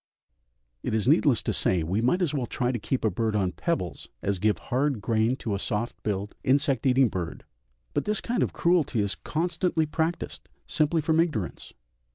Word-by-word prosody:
It 110 - -1
is 110 - 0
needless - - +4
to - - -1
say 90 -3 +1
we 95 +7 0
might 175 +10 +2
as 160 - 0
well 130 -5 -1
try 125 -1 0
to 120 - -2
keep 125 +3 -1
a 110 - +3
bird 110 +3 -1
on 95 -3 +1
pebbles 130 - -3
as 100 -2 0
give 105 +2 +2
hard 135 -1 0
grain 110 +3 +1
to 115 -5 -3
a 100 - -1
soft 105 +4 -2
billed 100 -1 -2
insect 140 +1 +2
eating 130 0 +5
bird; 90 -5 -5 0.5
but - - 0
this 210 0 +1
kind 240 0 -1
of - - +1
cruelty 170 -9 +2
is 100 -1 +1
constantly 170 0 0
practised 160 +2 -3 0.2
simply 155 +1 +1
from 160 +1 +2
ignorance. 150 - -1
125 Hz, 190 wpm, -27 LUFS, 105-155 Hz, 0.5 s, eating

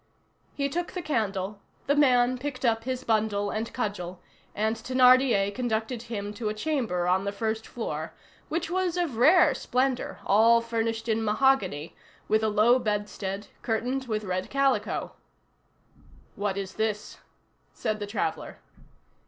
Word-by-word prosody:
He 280 -1 0
took 345 +5 -3
the 360 - -4
candle; 205 -8 -2 0.3
the 285 - +3
man 255 -3 +4
picked 270 -1 -4
up 225 -1 +1
his 255 0 -3
bundle 210 -2 +1
and 220 +1 -3
cudgel, 185 -7 -4 0.4
and 220 +2 0
Thénardier 250 -3 +4
conducted 230 0 -2
him 205 -3 -5
to 215 0 -3
a 215 - -3
chamber 220 - -1
on 185 +2 +2
the 200 - -2
first 220 +2 -3
floor, 235 - -4 0.4
which 330 +1 -2
was 365 -1 0
of 330 -10 -1
rare 305 +4 +6
splendor, 255 0 -1
all 225 +3 +5
furnished 230 -1 -2
in 225 0 +1
mahogany, 210 - +1 0.3
with 215 0 +3
a 220 - +1
low 220 +4 +4
bedstead, 205 -2 -3 0.2
curtained 250 +4 -1
with 215 -2 -2
red 185 -1 -3
calico. 275 0 0 1.2
"What 200 -1 -2
is 195 -1 -4
this?" 215 -1 -3 0.5
said 215 0 -3
the 205 - -4
traveller. 205 - -3
225 Hz, 145 wpm, -27 LUFS, 205-255 Hz, 1.2 s, rare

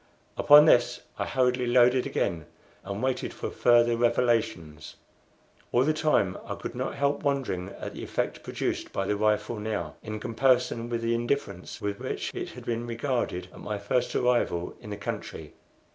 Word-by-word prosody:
Upon 150 +1 +8
this 120 -4 +4 0.2
I - - -1
hurriedly 125 -1 +1
loaded 125 +1 +4
again, 85 -5 -2 0.4
and 100 +4 -5
waited 130 -1 -1
for - - -4
further 120 -1 +4
revelations. 115 -10 0 0.8
All 125 - +4
the 155 +3 +2
time 150 -12 +1
I 100 -3 -5
could - - -6
not 125 +1 -3
help 140 0 0
wondering 135 -11 -1
at - - -6
the - - -7
effect - - -2
produced - - -3
by 95 - -2
the 105 - 0
rifle 105 +2 0
now, 105 0 -3
in 110 -1 -5
comparison 120 0 +1
with 115 -1 -2
the 115 0 +1
indifference 120 -6 -2
with 100 0 -3
which - - -4
it - - -4
had - - -11
been 120 0 -2
regarded 120 -6 -2
at - - -12
my 105 0 -4
first 120 +5 -1
arrival 120 -8 +1
in 105 - -10
the 100 - -5
country. 100 - -6
120 Hz, 170 wpm, -27 LUFS, 105-125 Hz, 0.8 s, Upon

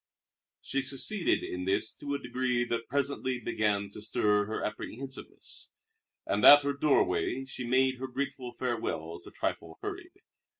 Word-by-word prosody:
She 135 - 0
succeeded 140 +9 +1
in 90 0 -4
this 100 +3 +1
to 140 0 -3
a - - -2
degree 125 -1 0
that 115 -1 -2
presently 140 -2 0
began 105 -3 0
to 105 - -10
stir 105 -1 +2
her 110 - -2
apprehensiveness, 130 +5 -5 0.6
and - - 0
at 145 0 +10
her 140 0 0
doorway 140 -2 +2
she 130 -2 -6
made 130 +1 +3
her 130 - -3
grateful 130 -1 -4
farewells 85 -9 -3
a - - -10
trifle 80 -1 -3
hurried. - - -6
125 Hz, 145 wpm, -30 LUFS, 105-135 Hz, 0.6 s, at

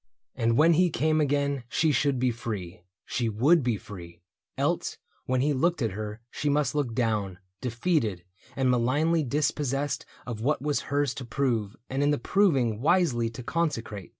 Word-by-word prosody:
And 115 0 +1
when 165 +3 +6
he 180 +2 +4
came 155 0 +1
Again 140 -2 0
she 155 +5 +2
should 140 0 +1
be 125 0 +2
free 100 -7 -6
— 90 - -65
she 120 -2 +1
would 140 +11 +4
be 120 -4 0
free. 85 -4 -11 0.3
Else, - - -1 0.3
when 130 0 +1
he 145 +2 +2
looked 170 +5 +1
at 115 -6 0
her 105 +2 -6
she 150 - -2
must 145 -2 +1
look 140 -6 -1
down, 105 -6 0 0.2
Defeated, 120 - 0 0.3
and 130 -1 +2
malignly 145 +7 +2
dispossessed 145 0 -1 0.2
Of 115 -3 -5
what 145 +6 +1
was 145 +1 -1
hers 140 -2 +1
to 130 - -7
prove 115 -4 -1
and 135 +2 -2
in 145 - +3
the 145 - +2
proving 130 - +2
Wisely 140 -8 +2
to 115 +2 -9
consecrate. 115 - -2
130 Hz, 175 wpm, -27 LUFS, 115-150 Hz, 0.3 s, when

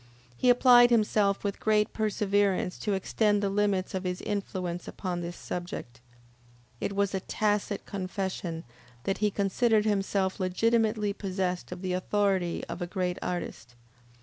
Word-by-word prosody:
He 250 - +2
applied 245 -1 +7
himself 210 -3 +2
with 200 -1 -2
great 215 -1 +2
perseverance 205 -3 +1
to 210 - -1
extend 205 +2 +1
the 195 - +1
limits 200 -2 0
of 190 -1 -2
his 180 -1 -2
influence 185 -4 -3
upon 180 -2 -4
this 175 0 -5
subject. 175 -9 -6 0.8
It 200 - -3
was 200 0 +1
a 190 - 0
tacit 205 +1 -1
confession 185 -4 -4 0.4
that 195 - -1
he 210 0 +3
considered 210 +2 +2
himself 195 -2 0
legitimately 215 +2 +1
possessed 185 -3 -3
of 180 +1 -7
the 185 -1 -1
authority 185 -2 0
of 170 +2 -6
a 175 - -2
great 180 -1 -2
artist. 120 -9 -5
195 Hz, 145 wpm, -28 LUFS, 180-210 Hz, 0.8 s, applied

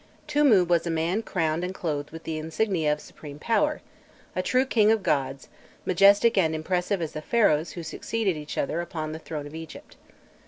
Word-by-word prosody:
Tûmû 285 - +4
was 170 0 +2
a - - -1
man 165 +6 0
crowned 165 -5 -1
and 185 +1 -4
clothed 150 -5 -3
with 165 0 -10
the 160 -1 -3
insignia 160 0 0
of 150 - -1
supreme 145 -1 -11
power, 235 - 0 0.5
a 185 - +1
true 255 +7 +2
king 215 -5 +3
of 220 -3 +1
gods, 135 -3 -1 0.4
majestic 200 +4 +5
and 160 -3 +2
impassive 180 +3 -1
as 155 - -4
the 155 - -6
Pharaohs 160 -6 +2
who 170 - -6
succeeded 195 +4 -2
each 150 -1 -7
other 160 +4 -1
upon 155 -3 -5
the 160 - -6
throne 155 -2 -6
of 145 - -10
Egypt. 160 -1 -10
170 Hz, 190 wpm, -26 LUFS, 155-200 Hz, 0.5 s, majestic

